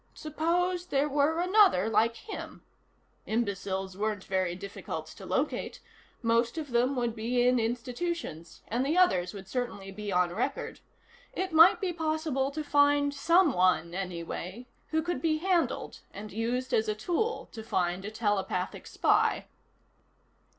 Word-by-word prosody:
Suppose 345 Hz, +3 st, -1 dB
there 280 Hz, -4 st, +1 dB
were 295 Hz, +3 st, +1 dB
another 365 Hz, -, +4 dB
like 230 Hz, +1 st, +2 dB
him. 420 Hz, -, -8 dB, 0.6 s
Imbeciles 195 Hz, -4 st, -2 dB
weren't 210 Hz, -1 st, -2 dB
very 185 Hz, -2 st, -1 dB
difficult 200 Hz, +1 st, -6 dB
to -, -, -11 dB
locate. -, -, -1 dB, 0.4 s
Most 230 Hz, +3 st, +2 dB
of 300 Hz, -4 st, -5 dB
them 245 Hz, +3 st, +2 dB
would 240 Hz, -2 st, -1 dB
be 245 Hz, +2 st, +1 dB
in 250 Hz, 0 st, +4 dB
institutions, 240 Hz, -, -4 dB
and 235 Hz, +4 st, 0 dB
the 300 Hz, +6 st, 0 dB
others 185 Hz, -, +3 dB
would 195 Hz, -1 st, -9 dB
certainly 205 Hz, -4 st, -4 dB
be 205 Hz, +1 st, -5 dB
on 180 Hz, -1 st, +2 dB
record. 220 Hz, -, -3 dB, 0.5 s
It 375 Hz, -2 st, -3 dB
might 325 Hz, +2 st, +7 dB
be 375 Hz, -3 st, -1 dB
possible 310 Hz, -4 st, -1 dB
to 305 Hz, +2 st, -4 dB
find 285 Hz, 0 st, +3 dB
someone, 275 Hz, -, +3 dB
anyway, 185 Hz, +4 st, -5 dB, 0.2 s
who 315 Hz, 0 st, 0 dB
could 350 Hz, +1 st, -2 dB
be 315 Hz, -2 st, +2 dB
handled 350 Hz, 0 st, 0 dB
and 210 Hz, +1 st, -8 dB
used 240 Hz, +4 st, -2 dB
as 220 Hz, -, +2 dB
a 215 Hz, -, 0 dB
tool 360 Hz, -, -1 dB
to 225 Hz, -, -7 dB
find 180 Hz, -4 st, -1 dB
a 205 Hz, -, -4 dB
telepathic 205 Hz, -4 st, -2 dB
spy. -, -, +2 dB
240 Hz, 145 wpm, -29 LUFS, 200-315 Hz, 0.6 s, might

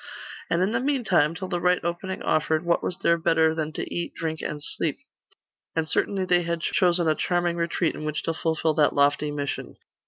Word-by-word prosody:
And 170 Hz, +2 st, +2 dB
in 195 Hz, -, +1 dB
the 230 Hz, -, +1 dB
meantime, 225 Hz, -, +2 dB
till 185 Hz, +2 st, -5 dB
the 175 Hz, -1 st, -2 dB
right 180 Hz, +1 st, +3 dB
opening 175 Hz, +3 st, -3 dB
offered, 155 Hz, +1 st, +1 dB
what 170 Hz, 0 st, +2 dB
was 180 Hz, -, -3 dB
there 170 Hz, 0 st, +3 dB
better 160 Hz, -1 st, +3 dB
than 155 Hz, -1 st, -3 dB
to -, -, -5 dB
eat, 175 Hz, -, -3 dB
drink, 160 Hz, -1 st, -3 dB
and 150 Hz, -, -4 dB
sleep? -, -, -1 dB, 0.8 s
And 160 Hz, -1 st, 0 dB
certainly 190 Hz, +3 st, +1 dB
they 180 Hz, -1 st, +3 dB
had 170 Hz, -1 st, -2 dB
chosen 175 Hz, -1 st, +2 dB
a 155 Hz, -, +4 dB
charming 175 Hz, +1 st, 0 dB
retreat 170 Hz, 0 st, 0 dB
in -, -, -7 dB
which 150 Hz, 0 st, -3 dB
to 165 Hz, -, -1 dB
fulfil 160 Hz, 0 st, 0 dB
that 150 Hz, -1 st, +2 dB
lofty 145 Hz, +1 st, +2 dB
mission. 145 Hz, -1 st, -4 dB
170 Hz, 205 wpm, -25 LUFS, 155-175 Hz, 0.8 s, a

